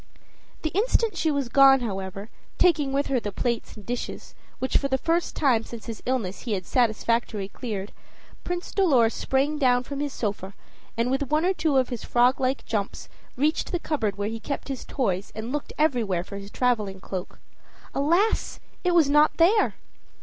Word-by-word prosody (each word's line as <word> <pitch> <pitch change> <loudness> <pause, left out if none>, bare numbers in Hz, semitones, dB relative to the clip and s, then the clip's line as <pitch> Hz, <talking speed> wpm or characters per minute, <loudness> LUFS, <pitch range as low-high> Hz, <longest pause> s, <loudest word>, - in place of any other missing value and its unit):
The 315 - -1
instant 445 0 +1
she 325 - +1
was 280 -4 0
gone, 270 +1 +6
however, 195 -1 -5 0.3
taking 300 -6 +3
with 280 +1 +1
her 265 -2 +1
the 210 -3 -4
plates 235 +3 -2
and 210 -3 -12
dishes, 245 0 -5 0.2
which 260 - -3
for 280 - -1
the 265 -1 +1
first 335 +4 0
time 250 -6 +3
since 230 -1 -9
his 225 -3 -7
illness 225 -8 -1
he 230 - -3
had 185 -3 -3
satisfactorily 230 -3 0
cleared, 205 -4 -5 0.5
Prince 355 0 -4
Dolor 270 - +4
sprang 280 +5 0
down 250 -3 +3
from 280 +1 -6
his 290 -1 -2
sofa, 200 -5 -4 0.4
and 235 +2 +1
with 270 0 -1
one 305 +3 +2
or 375 - +3
two 310 -6 +1
of 260 -1 +2
his 245 -4 -5
frog 245 +2 +3
like 260 +1 0
jumps 205 -3 -3 0.3
reached 300 +5 0
the 350 - +1
cupboard 230 - -2
where 205 0 -1
he 225 +1 -4
kept 280 +5 -5
his 270 -2 -4
toys, 195 -8 -1
and 220 +3 -5
looked 295 0 -3
everywhere 230 - +1
for 200 +2 -8
his 200 0 -9
traveling 210 -6 0
cloak. 185 -1 -6 0.6
Alas! 340 +10 +1 0.2
it 355 -1 +2
was 325 -4 +6
not 295 +2 +4
there. 390 +6 +4
255 Hz, 185 wpm, -25 LUFS, 220-295 Hz, 0.6 s, gone